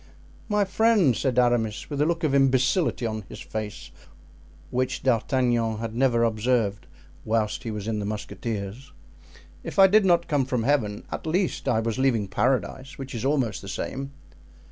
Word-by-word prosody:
"My 210 -1 +2
friend," 200 - +3
said 130 0 -1
Aramis, 120 -3 +1
with 145 0 -1
a 150 - +3
look 170 -1 -1
of 150 -3 +1
imbecility 135 +1 +2
on 110 -1 -2
his - - -9
face 110 -1 -6 0.8
which 130 +1 -1
D'Artagnan 120 -2 +1
had 115 0 -5
never 120 -1 +2
observed 110 -2 0 0.4
whilst 110 -1 0
he 120 - -5
was 105 -1 -5
in 110 -2 -1
the 100 - -3
musketeers, 110 +4 -5 0.7
"if - - -7
I 195 - +9
did 210 +2 +5
not 170 -2 +3
come 145 -4 +1
from 125 -3 -1
Heaven, 115 -6 0
at - - -5
least 180 +3 -1
I 110 -2 +2
was 115 +2 -2
leaving 120 -6 +2
Paradise, 130 +5 -1
which 135 0 -7
is 115 - -4
almost 135 -5 0
the 100 - -10
same." 135 +7 -4
125 Hz, 165 wpm, -25 LUFS, 110-140 Hz, 0.8 s, I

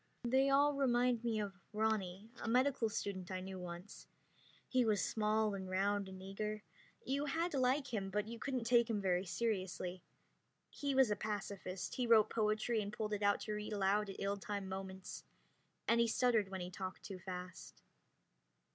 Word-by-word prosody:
They 265 +3 +3
all 285 +2 +5
remind 250 -3 +2
me 230 -2 0
of 200 -2 -4
Ronny, 215 -1 -1
a - - -4
medical 250 0 +3
student 190 -3 -3
I 185 -1 -2
knew 190 0 -6
once. 175 +2 -8 0.6
He 255 -1 +3
was 215 -4 +2
small 215 -1 +1
and 190 -1 -5
round 200 +1 +1
and 190 0 -9
eager. 210 +2 -4 0.4
You 280 +2 0
had 330 +4 0
to 275 - 0
like 260 +1 +2
him, 195 -3 -1
but 210 +2 -1
you 230 0 -6
couldn't 255 0 -2
take 235 0 +4
him 220 -2 +1
very 185 -1 +1
seriously. 185 -4 -2 0.7
He 280 -2 -2
was 260 -5 +5
a - - +3
pacifist; 200 -3 -4
he 250 -2 -1
wrote 225 -2 +6
poetry 215 +1 +1
and 205 0 -4
pulled 215 0 -3
it 205 - -1
out 205 0 +3
to 215 - -3
read 210 0 -4
aloud 200 +1 +2
at 195 - -6
ill 200 +1 -1
timed 200 -1 -4
moments; 190 0 -6 0.6
and 230 - +4
he 235 - +4
stuttered 230 -3 +3
when 190 -1 -4
he 180 +1 -5
talked 185 0 -6
too 195 -2 -6
fast. 180 0 -8
210 Hz, 180 wpm, -37 LUFS, 190-235 Hz, 0.7 s, wrote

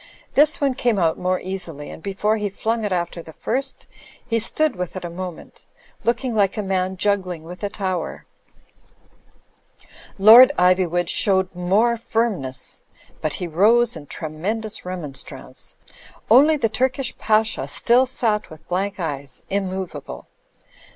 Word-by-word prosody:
This 300 +2 +4
one 275 -2 +1
came 245 -4 0
out 165 -3 +1
more 185 0 0
easily; 175 -6 -6
and - - -10
before 205 +3 0
he 210 -1 -2
flung 225 +3 -2
it 205 - -2
after 175 -1 -2
the 160 -1 -13
first, 265 - -3 0.4
he 230 -2 +1
stood 310 +6 +1
with 180 0 -5
it 185 - -5
a 170 - -5
moment; 180 -1 -8 0.4
looking 240 +1 0
like 205 -1 +1
a 210 - -1
man 190 -1 -1
juggling 185 -4 -1
with 180 +4 -10
a 205 - 0
tower.. 185 -4 -4 1.9
Lord 230 +7 +9
Iv3nvood 180 -1 +2
showed 190 0 +2
more 200 +7 +2
firmness; 210 - -2 0.4
but 155 - -1
he 180 - -4
rose 215 +8 +3
in 150 -3 -10
tremendous 195 +11 -4
remonstrance. 160 -7 -7 0.6
Only 295 +6 +7
the 230 - +1
Turkish 255 +3 -1
Pasha 220 0 +1
still 250 +2 +3
sat 220 -4 0
with 155 0 -14
blank 195 +3 -2
eyes, 140 -5 -5
immovable. 190 -6 -4
195 Hz, 140 wpm, -22 LUFS, 175-225 Hz, 1.9 s, Lord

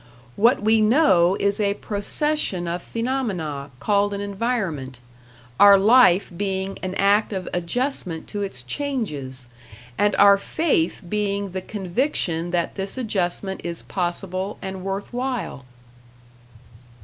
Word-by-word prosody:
What 235 +2 +3
we 220 +1 +4
know 205 - +4
is 200 +1 +1
a 200 -1 +1
procession 205 - -2
of 175 +1 -3
phenomena 195 - -3
called 200 +6 +1
an - - -4
environment; 195 - -3 0.6
our 200 -1 +9
life 205 -3 +5
being 195 0 -3
an 185 0 -4
act 200 +3 +3
of 190 -3 -4
adjustment 180 - -2
to 205 - -4
its 130 -12 -5
changes, 145 - -4 0.5
and 205 0 +3
our 200 0 +6
faith 275 - 0
being 200 0 -1
the 185 +1 -4
conviction 185 - -1
that 175 -1 -1
this 195 +4 -4
adjustment 190 -4 -2
is 170 -1 -5
possible 185 +2 -3
and 190 -1 -6
worth 195 +4 -4
while. 245 - -3
200 Hz, 125 wpm, -23 LUFS, 175-215 Hz, 0.6 s, our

